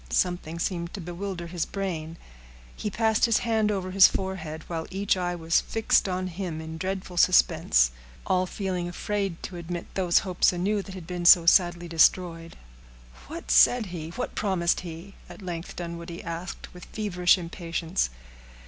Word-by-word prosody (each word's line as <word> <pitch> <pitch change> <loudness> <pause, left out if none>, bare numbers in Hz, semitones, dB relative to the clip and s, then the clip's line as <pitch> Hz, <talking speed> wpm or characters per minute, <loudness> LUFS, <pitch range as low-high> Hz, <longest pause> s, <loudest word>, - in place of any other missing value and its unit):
Something 170 - -1
seemed 170 +1 -3
to - - -6
bewilder 175 +1 -5
his 170 -1 -3
brain. 170 -5 -4 0.6
He 210 - -3
passed 220 +2 +2
his 230 -2 +3
hand 220 -2 +2
over 185 -2 -3
his 195 0 +8
forehead, 160 -5 -4
while 165 -2 -4
each 195 +1 0
eye 175 -1 -2
was 165 -1 +1
fixed 220 -3 +1
on 185 0 -2
him 180 -2 -5
in 160 0 -7
dreadful 190 -1 -4
suspense—all - - +2
feeling 185 -2 -3
afraid 195 -1 -3
to 180 - -6
admit 170 0 -5
those 180 -3 +2
hopes 185 -2 +3
anew 195 +4 0
that 195 -1 -10
had 180 -3 -8
been 175 0 -5
so 170 -1 +8
sadly 175 0 +4
destroyed. 165 0 +2 0.7
"What - - -6
said 225 - +6
he? 160 -2 -5
What 170 - -5
promised 185 -4 +1
he?" 175 +2 -9 0.2
at - - -11
length 175 -2 -6
Dunwoodie 170 0 -7
asked, 170 +2 -6
with 180 -1 -11
feverish 180 -4 +2
impatience. 170 - -2
175 Hz, 155 wpm, -26 LUFS, 165-190 Hz, 0.7 s, his